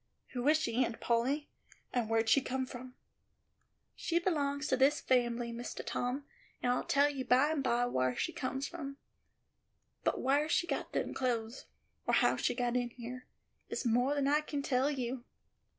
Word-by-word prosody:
"Who 245 +1 -2
is 305 +1 +6
she, 250 -5 +1
Aunt 230 -2 -3
Polly, 260 +6 0 0.4
and 240 -3 0
where'd 225 0 +2
she 225 +5 +5
come 260 0 -2
from?" 255 0 -9 1.0
"She 340 - 0
belongs 295 -5 0
to 260 - +4
this 275 +3 +4
fambly, 240 -2 +1
Mistah 240 +1 -5
Tom, 255 +3 -2 0.4
and 245 - +3
I'll 250 - +1
tell 280 +1 +4
you 270 -2 -4
by 255 +5 +4
and 300 -4 0
by 240 -1 +2
whar 130 - 0
she - - -1
come 265 0 -3
from; 280 -2 -5 1.1
but - - +1
whar 285 +4 +2
she 345 - +2
got - - -3
them - - -1
clothes, 235 -1 -2 0.4
or - - +4
how - - +4
she - - 0
got 245 -1 0
in 245 -1 +1
here, 245 +1 -8 0.4
is - - -3
more 245 +5 +3
than 280 -1 +1
I 295 +2 +4
can 290 -2 -4
tell 265 +1 +2
you." 255 -3 -3
255 Hz, 180 wpm, -33 LUFS, 240-285 Hz, 1.1 s, is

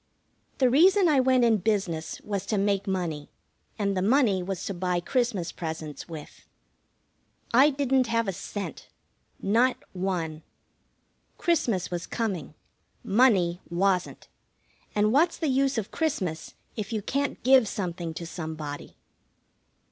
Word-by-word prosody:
The 260 - +4
reason 360 +9 +5
I 295 -4 +4
went 255 -1 +4
in 225 -2 +4
business 190 -5 -1
was 200 -2 -4
to 215 - 0
make 200 0 +1
money, 170 -6 -2 0.5
and 200 -2 0
the 185 - 0
money 215 -3 +3
was 185 0 -4
to 200 - -3
buy 180 -1 -1
Christmas 225 -3 -1
presents 160 -2 -6
with. 155 -3 -10 1.1
I 265 +5 +7
didn't 270 -3 +1
have 230 -1 0
a 195 - -1
cent. 200 +3 -6 0.5
Not 235 +6 +3 0.2
one. 175 -4 -2 1.0
Christmas 235 - 0
was 175 -1 -4
coming. 190 - -3 0.5
Money 195 -6 +3
wasn't. 180 +1 0 0.7
And 210 0 +3
what's 330 +5 +3
the 315 - -1
use 270 0 +2
of 220 -1 -3
Christmas 190 - -2 0.2
if 215 0 -5
you 215 -3 -2
can't 280 +4 -2
give 260 -2 +6
something 175 -5 -4
to 170 - -5
somebody? 155 -3 -6
200 Hz, 135 wpm, -27 LUFS, 175-255 Hz, 1.1 s, I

